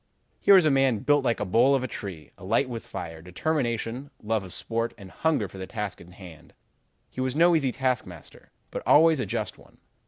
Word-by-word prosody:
"Here 200 - +6
was 185 -4 +6
a 155 - +4
man 135 -5 +2
built 145 -1 +3
like 120 -3 +1
the 105 - -2
bole 120 +8 +4
of 130 - 0
a - - -2
tree, 95 -9 -8
alight 115 +8 0
with 120 -2 -6
fire, 80 -4 -7
determination, 120 - -2
love 110 -1 0
of 95 - -9
sport, 115 +5 -3
and 95 -4 -12
hunger 155 -10 0
for 95 - -12
the 95 - -6
task 105 -3 -5
in 90 +1 -14
hand. 85 -4 -14 0.6
He 130 - -5
was 130 0 -1
no 170 +2 +5
easy 140 -5 +1
taskmaster, 125 - -4 0.2
but - - -4
always 160 0 +6
a 125 - -2
just - - -4
one. - - -20
115 Hz, 210 wpm, -26 LUFS, 95-135 Hz, 0.6 s, Here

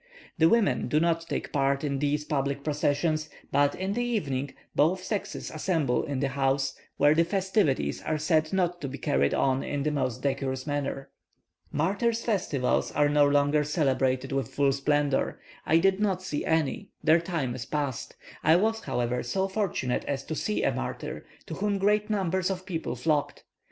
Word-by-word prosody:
The 160 0 +6
women 230 -1 +2
do 150 - +2
not 165 0 +1
take - - -3
part 140 -1 +1
in 140 -2 -1
these 145 +1 0
public 140 -1 -1
processions; 155 +1 0 0.2
but, 145 0 +3
in 190 +1 -2
the 240 +3 0
evening, 140 - -2 0.2
both 180 +5 +2
sexes 205 +1 -4
assemble 155 -6 0
in 140 -2 -3
the 140 - +1
houses, 135 0 0 0.2
where 145 +1 +5
the 165 +2 +4
festivities 185 - 0
are 155 - -1
said 155 0 +1
not 180 -2 0
to 140 - -3
be 135 +1 -6
carried 70 - +1
on 135 0 +2
in 145 -1 -2
the 150 - +1
most 130 -3 -2
decorous 135 -1 -1
manner. 140 -2 -3 0.6
Martyrs' 205 +9 0
festivals 180 - 0
are 145 0 +3
no 145 0 +4
longer 145 +1 +3
celebrated 135 -3 0
with 135 -1 -2
full 140 0 +2
splendour. 140 0 0 0.3
I 160 - +5
did 190 +3 +3
not 190 -3 0
see 150 -5 -3
any; 160 -3 0
their 160 +2 +5
time 165 -8 -2
is 120 -2 -6
past. 145 -5 -3 0.3
I 160 +2 +6
was, 220 +5 +2
however, 125 - -1
so 190 +10 -1
fortunate 190 - -1
as 135 -1 -2
to 160 - -5
see 210 +7 -1
a - - +2
martyr, - - -5 0.2
to - - -7
whom 205 0 0
great 210 +2 +2
numbers 190 -3 0
of 185 -1 -4
people 170 -4 -3
flocked. 150 -3 -1
150 Hz, 175 wpm, -27 LUFS, 135-185 Hz, 0.6 s, The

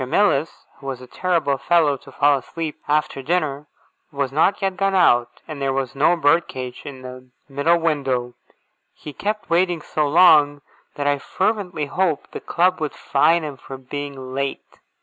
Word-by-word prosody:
Mills, 160 -1 +1
who 135 - -10
was 130 -2 -4
a 125 - -11
terrible 155 -1 -1
fellow 165 -5 +3
to 135 0 -14
fall 145 +1 +3
asleep 160 +4 -6
after 150 -2 0
dinner, 150 -2 -1 0.4
had 140 -2 -2
not 160 +7 +2
yet 195 -2 -1
gone 195 0 0
out, 120 -10 +3
and 155 -3 -7
there 135 -1 0
was 135 -1 -2
no 150 +5 +3
bird 165 +1 +3
cage 125 -1 -7
in 135 -3 -9
the 130 0 -10 0.2
middle 145 +5 +2
window. 135 -7 -1 0.6
He 150 - -10
kept 210 +5 -3
me 170 - +4
waiting 175 -2 +1
so 150 -1 -1
long, 150 -3 +5 0.3
that 145 - -3
I 145 0 +1
fervently 190 -3 -2
hoped 165 0 -1
the - - -6
Club 180 0 +1
would 155 - -2
fine 160 +4 +2
him 145 -3 -6
for 135 +1 -9
being 135 -1 -7
late. 140 +1 -4
145 Hz, 175 wpm, -21 LUFS, 135-170 Hz, 0.6 s, long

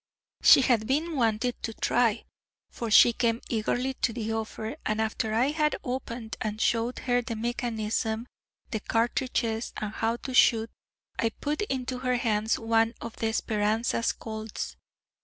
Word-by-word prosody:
She - - +8
had 235 -4 +2
been 315 +5 0
wanting 235 -1 +1
to 225 - -4
try, 235 -3 +1 0.5
for 235 - -4
she 235 +2 +7
came 230 0 +1
eagerly 245 +3 0
to 235 - +2
the 225 -1 -3
offer, 220 0 -4
and 215 0 -1
after 220 0 -1
I 235 +5 +2
had 300 -1 +1
opened 245 -3 -5
and 215 0 -3
showed 235 +2 +1
her 245 -1 +2
the 230 -1 -5
mechanism, 225 -1 -2 0.5
the 220 - -1
cartridges, 230 0 -1
and 210 0 -4
how 225 +1 0
to 260 - -4
shoot, 230 -3 +4 0.5
I 230 - +2
put 295 - -3
into 260 -9 -2
her 250 -1 0
hands 220 -2 +1
one 225 0 +2
of 230 - -8
the 225 -1 0
Speranza 220 +2 0
Colt's. 220 -1 -6
230 Hz, 155 wpm, -28 LUFS, 220-245 Hz, 0.5 s, She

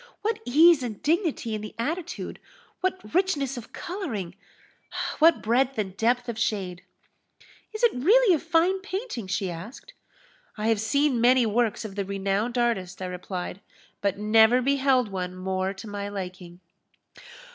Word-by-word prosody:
What 445 +1 0
ease 310 +4 +6
and 230 -5 -5
dignity 315 - 0
in 215 - -3
the 215 - -8
attitude! 325 +8 -4 0.4
what 370 -12 -3
richness 315 -8 +1
of 240 -2 -9
colouring 245 - -5 0.9
what 325 0 +5
breadth 255 +4 +2
and 190 -3 -3
depth 245 +3 +1
of 230 -2 -4
shade!" 190 -6 -2 0.9
"Is 435 +1 -6
it 475 - +5
really 400 - +5
a 320 - +2
fine 335 +4 +2
painting?" 380 - -5
she 190 -1 -1
asked. 210 - -9 0.6
"I 215 +1 0
have 220 -2 +2
seen 260 +2 +1
many 250 0 +5
works 225 0 0
of 205 - -6
the 200 0 -2
renowned 200 +5 -1
artist," 195 -7 0
I 185 - -4
replied, 180 +1 -5 0.4
"but 200 -1 0
never 220 +3 +5
beheld 265 -2 +2
one 180 -1 -4
more 185 +1 -2
to 200 +3 -9
my 205 -1 -4
liking!" 185 -3 -7
230 Hz, 150 wpm, -26 LUFS, 195-295 Hz, 0.9 s, ease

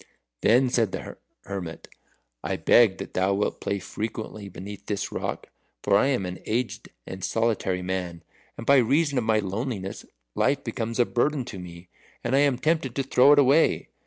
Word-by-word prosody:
Then 125 +4 +4
said 115 -6 +2
the - - -6 0.3
hermit, 95 -4 -6 0.6
"I - - -1
beg 110 -6 +5
that - - -8
thou 95 +2 +1
wilt 100 - -2
play 100 - -1
frequently 110 +1 -6
beneath 100 +2 -9
this 100 -2 -2
rock; - - -4 0.3
for 100 - +3
I 105 - +4
am 125 -9 0
an 90 0 -6
aged 115 +2 -2 0.2
and 95 -1 -8
solitary 95 -4 0
man, 90 -2 -4 0.3
and 115 - -7
by 140 +2 +6
reason 140 +3 +2
of - - -2
my 110 -1 +3
loneliness, 100 0 -3 0.3
life 140 +2 +1
becomes 115 -1 -3
a 120 - +4
burden 135 +2 0
to 105 -6 -8
me, 90 0 -11 0.3
and 120 +2 +1
I - - +5
am 140 -3 +3
tempted 155 -3 0
to 135 - 0
throw 135 +1 +5
it - - +3
away. 145 +3 +4
110 Hz, 180 wpm, -25 LUFS, 95-130 Hz, 0.6 s, by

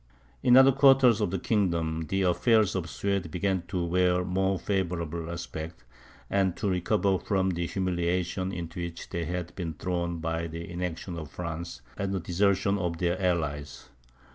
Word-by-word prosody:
In 125 -1 +6
other 135 +1 +8
quarters 135 -4 +5
of 105 - +1
the 95 - -1
kingdom, 85 -6 0
the 95 0 +1
affairs 105 +3 +3
of 95 - 0
the 85 - -9
Swedes 100 +6 -1
began 95 +2 -1
to 90 -3 -1
wear 90 +1 +2
a - - -3
more 95 +1 +1
favourable 85 -4 -2
aspect, 80 -2 -6 0.4
and 95 -3 +1
to - - -1
recover 95 +1 +1
from 95 +1 0
the 85 -1 -2
humiliation 90 0 -1
into 85 -1 -5
which 85 -1 -7
they 85 -2 -2
had 90 +1 -4
been 85 -4 -4
thrown 85 +1 -2
by 80 0 -2
the 85 +1 -7
inaction 90 0 -4
of 75 -3 -8
France, 85 +1 -6 0.2
and 100 0 -2
the - - 0
desertion 100 +3 +1
of 85 -3 -2
their 90 +2 0
allies. 75 -5 -2
90 Hz, 170 wpm, -28 LUFS, 85-95 Hz, 0.4 s, other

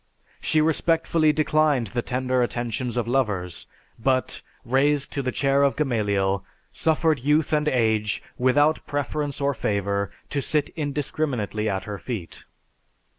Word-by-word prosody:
She 155 - +2
respectfully 160 0 +2
declined 155 -4 +2
the 120 - 0
tender 130 +1 0
attentions 120 0 -2
of 120 -2 0
lovers, 105 -9 -1 0.3
but, 130 +2 0 0.2
raised 140 +3 +2
to 140 - -1
the 130 -1 -2
chair 140 +1 +2
of 140 -1 +3
Gamaliel, 100 -8 0 0.3
suffered 160 -2 +2
youth 150 +4 +1
and 150 0 +2
age, 110 -6 +1
without 145 +5 +3
preference 145 0 -2
or 140 0 +1
favor, 100 -3 -1 0.2
to 140 - 0
sit 150 +1 0
indiscriminately 140 -8 -2
at 95 -1 -2
her 105 -1 -6
feet. 105 -9 -6
130 Hz, 130 wpm, -24 LUFS, 110-150 Hz, 0.3 s, of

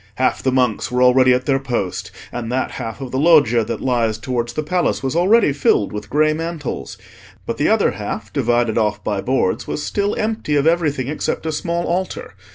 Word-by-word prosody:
Half 130 - 0
the 130 - +1
monks 125 -4 +1
were 125 0 +1
already 130 0 +5
at 125 +1 +1
their 135 -1 +2
post, 120 -9 -3 0.2
and 120 -1 -5
that 130 +1 -1
half 115 +4 -6
of 130 -2 -6
the 130 - -1
Loggia 140 -8 +5
that 115 - -4
lies 115 -4 0
towards 120 0 -3
the 155 - -2
Palace 175 0 0
was 135 +2 -2
already 190 -1 +4
filled 130 -8 +1
with 105 0 -6
grey 155 +3 +3
mantles; 160 - -5 0.5
but - - -3
the - - +2
other - - +3
half, - - -6
divided 120 -1 +1
off 105 -1 -1
by 100 -2 -1
boards, 130 -6 0
was 150 - -3
still 205 0 -1
empty 215 -8 -1
of 140 0 +2
everything 155 -6 +1
except 150 +2 -3
a 160 - -1
small 170 +3 -2
altar. 180 +2 -3
130 Hz, 200 wpm, -19 LUFS, 120-155 Hz, 0.5 s, already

